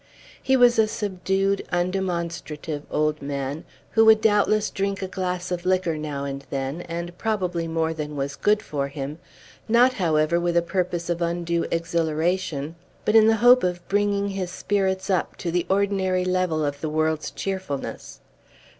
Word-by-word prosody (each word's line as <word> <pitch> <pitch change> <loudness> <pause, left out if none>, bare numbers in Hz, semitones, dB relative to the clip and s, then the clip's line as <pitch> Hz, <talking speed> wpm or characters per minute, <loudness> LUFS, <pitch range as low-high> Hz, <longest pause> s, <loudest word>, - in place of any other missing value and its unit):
He 265 0 +3
was 245 -2 +5
a 220 - +5
subdued, 195 -1 -1
undemonstrative 170 -4 -2
old 155 0 0
man, 140 +1 -4 0.3
who 225 - +5
would 220 -1 +7
doubtless 210 0 +2
drink 195 0 -2
a - - -2
glass 180 -1 -3
of 175 -1 -2
liquor, 185 -3 +1
now 150 -2 -4
and 140 0 -5
then, 135 +4 -3
and 170 +1 -5
probably 180 -6 -1
more 160 0 0
than 150 -1 -5
was 140 0 -3
good 210 +1 +2
for 140 -7 -2
him, 140 +2 -6 0.5
not, 245 +3 +5
however, 165 -5 +2
with 175 0 0
a 170 - +4
purpose 175 -1 -2
of 175 0 -2
undue 170 0 -1
exhilaration, 165 -2 -1 0.3
but 210 - +2
in 220 -1 +7
the 225 - +5
hope 250 +1 +8
of 180 -1 -2
bringing 200 0 +1
his 190 -2 -3
spirits 190 0 -1
up 185 - 0
to 170 - -4
the 175 0 0
ordinary 190 -2 +1
level 180 -4 +1
of 145 0 -3
the 155 - -2
world's 155 0 0
cheerfulness. 190 -8 -5
175 Hz, 165 wpm, -24 LUFS, 155-195 Hz, 0.5 s, hope